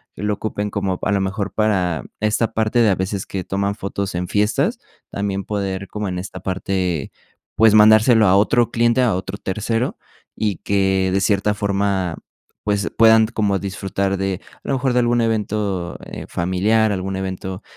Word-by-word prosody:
que - - -7
lo 105 0 +1
ocupen 105 0 -3
como 95 -2 -2
a - - 0
lo 100 - +1
mejor 100 +1 -3
para 90 - 0 0.2
esta 110 +2 +1
parte 110 +2 +1
de 115 -2 +5
a - - +2
veces 95 +1 -3
que 95 -2 -4
toman 100 +1 -1
fotos 100 -1 -4
en 90 0 -2
fiestas, 105 +3 +1 0.3
también 100 -1 -3
poder 100 -2 -3
como 105 -1 -4
en 90 - -3
esta 95 - -7
parte, 95 -4 -2 0.4
pues, 110 -1 +5
mandárselo 110 +1 +6
a 95 - +5
otro 115 +4 +3
cliente, 120 +2 +2
a 120 -7 +2
otro 95 +2 -5
tercero 110 +5 -2 0.4
y 105 -4 -1
que 95 -1 +1
de 95 - +2
cierta 100 +1 +2
forma, 100 -3 -1 0.5
pues, 100 -4 0
puedan 110 -1 +6
como 105 -3 0
disfrutar 95 0 -2
de 95 0 -2
a - - -27
lo - - 0
mejor 130 0 0
de 125 - +3
algún 120 0 +2
evento, 105 -5 -1
eh, - - -8
familiar, 105 +5 +1
algún 95 0 -3
evento 95 0 -5
100 Hz, 175 wpm, -20 LUFS, 95-110 Hz, 0.5 s, mandárselo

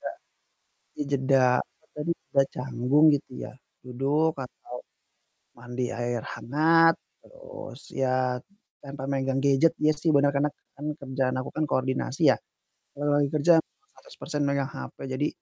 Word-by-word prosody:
Enggak - - -6 0.8
dijeda, 135 -2 +2 0.2
apa - - -29
tadi, 150 +3 -1 0.2
udah 135 0 +5
canggung 130 +4 +2
gitu 140 -1 -4
ya, - - -8 0.3
duduk 140 +6 +1
atau 125 - -16 0.9
mandi 120 +1 -4
air 120 0 -2
hangat, 165 +5 +4 0.3
terus, - - -11
ya 130 -1 +1 0.5
tanpa 140 -1 -7
megang 135 -1 0
gadget, 140 +4 +4
ya 155 0 +4
sih 155 +2 0
bener, 140 0 +5
karena 145 +1 +2 0.3
kan 145 - -8
kerjaan 130 -2 -1
aku 130 - -6
kan 155 - 0
koordinasi 130 +3 +1
ya. - - -6 0.6
Kalau 145 0 +1
lagi 145 - +3
kerja 155 +3 +5
100% 415 - -8
megang 140 -1 0
HP. 140 - -8 0.2
Jadi, 145 +3 0
140 Hz, 135 wpm, -27 LUFS, 130-150 Hz, 0.9 s, udah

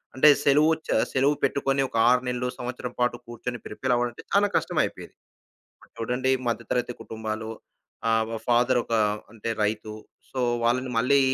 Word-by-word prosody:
అంటే 140 +3 +7
సెలవు 150 +3 +5 0.2
చ - - -16 0.2
సెలవు 140 +3 +3
పెట్టుకొని 135 0 +1
ఒక - - -3
6 125 0 +4
నెలలు, 125 0 -1
సంవత్సరం 125 0 -5
పాటు 120 -1 +1
కూర్చొని 120 +1 -5
ప్రిపేర్ 125 +4 -1
అవ్వడం 120 0 0
అంటే - - -12
చానా 205 +1 +4
కష్టమైపోయేది. - - -1 0.6
ఇప్పుడు - - -22
చూడండి 125 +3 0 0.2
మధ్యతరగతి 120 +1 -1
కుటుంబాలు 110 0 -5 0.6
ఆహ్, 110 0 +1
ఫాదర్ 125 +1 +3
ఒక 115 - -2 0.4
అంటే 115 -1 -6
రైతు. 105 +1 -1 0.4
సో, 130 - -3 0.2
వాళ్ళని 125 +2 +1
మళ్ళీ 140 +4 +4
125 Hz, 150 wpm, -26 LUFS, 115-130 Hz, 0.6 s, అంటే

